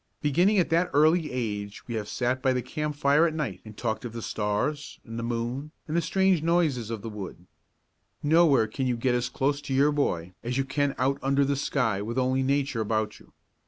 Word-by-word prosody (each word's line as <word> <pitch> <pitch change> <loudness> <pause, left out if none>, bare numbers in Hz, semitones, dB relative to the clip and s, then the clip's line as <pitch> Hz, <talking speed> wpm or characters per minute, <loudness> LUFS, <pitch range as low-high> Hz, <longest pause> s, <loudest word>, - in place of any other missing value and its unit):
Beginning 175 +9 +3
at 180 - +2
that 170 +2 +3
early 155 +1 +4
age 105 -5 -4
we 120 - -4
have 105 -2 -3
sat 125 +1 -1
by 130 0 +2
the 125 -1 -1
campfire 150 +1 +2
at 160 - -3
night 125 - -3
and 110 -1 -12
talked 110 -1 -2
of 120 -2 -6
the 115 -1 -6
stars 125 +8 -2
and 115 0 -6
the - - -2
moon 120 +5 -3 0.2
and 155 - -3
the 170 - +3
strange 190 -2 +2
noises 160 -9 +1
of 115 -3 -5
the - - -5
wood. 95 -4 -8 0.8
Nowhere 150 -5 +5
can 130 +5 -3
you 125 -1 0
get 125 +1 +1
as 125 +1 0
close 140 +3 0
to 140 -2 -3
your 145 +2 +4
boy 90 - -1
as 125 +2 -2
you 135 - +1
can 140 0 0
out 135 +2 +1
under 140 +1 +2
the 140 +1 +1
sky 125 -7 0
with 115 +4 -4
only 130 +1 +2
Nature 135 -2 0
about 110 0 -1
you. - - -20
130 Hz, 215 wpm, -27 LUFS, 115-150 Hz, 0.8 s, Nowhere